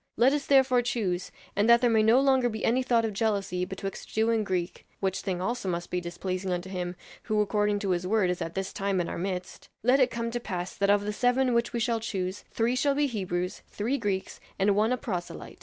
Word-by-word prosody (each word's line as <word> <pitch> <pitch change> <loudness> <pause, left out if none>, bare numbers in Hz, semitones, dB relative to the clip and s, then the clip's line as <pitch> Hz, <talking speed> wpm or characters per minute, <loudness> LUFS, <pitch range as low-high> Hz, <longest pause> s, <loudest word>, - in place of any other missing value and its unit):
Let 255 +4 +5
us 290 -1 -2
therefore 265 -3 +5
choose, 200 -7 -2 0.2
and 205 +3 +2
that 235 0 +7
there 245 - +4
may 220 -1 +4
no 225 +4 +5
longer 265 -2 +3
be 220 -1 -3
any 250 +3 +3
thought 235 -3 +2
of 220 - -2
jealousy 195 -4 0
betwixt 195 +1 -6
Jew 220 +1 +1
and 225 -1 +1
Greek 185 -3 -3
which 190 -1 -1
thing 185 -2 -2
also 195 +1 -2
must 175 0 -3
be 180 - -1
displeasing 185 +2 -4
unto 180 +1 -3
him, 180 -1 -3 0.3
who 215 -1 0
according 210 0 +1
to 195 -3 0
his 180 0 -1
word, 200 -3 +2
is 180 - -4
at 165 0 -4
this 195 0 -3
time 195 -1 -1
in 175 - -1
our - - -4
midst 185 0 -5
let 255 +4 +4
it 255 -1 +4
come 230 -1 -3
to 240 - -2
pass 180 -5 -5
that 200 0 +1
of 205 0 +3
the 210 - -2
seven 250 +2 +2
which 235 0 +1
we 235 - -2
shall 230 0 +1
choose, 190 -3 -3
three 235 +2 0
shall 280 +2 +2
be 290 +1 +2
Hebrews, 185 -7 -3
three 245 +7 -2
Greeks 195 -4 -2 0.2
and 200 +1 +3
one 215 +3 +2
a 255 - +1
proselyte. 185 -10 -6
210 Hz, 240 wpm, -28 LUFS, 185-235 Hz, 0.3 s, that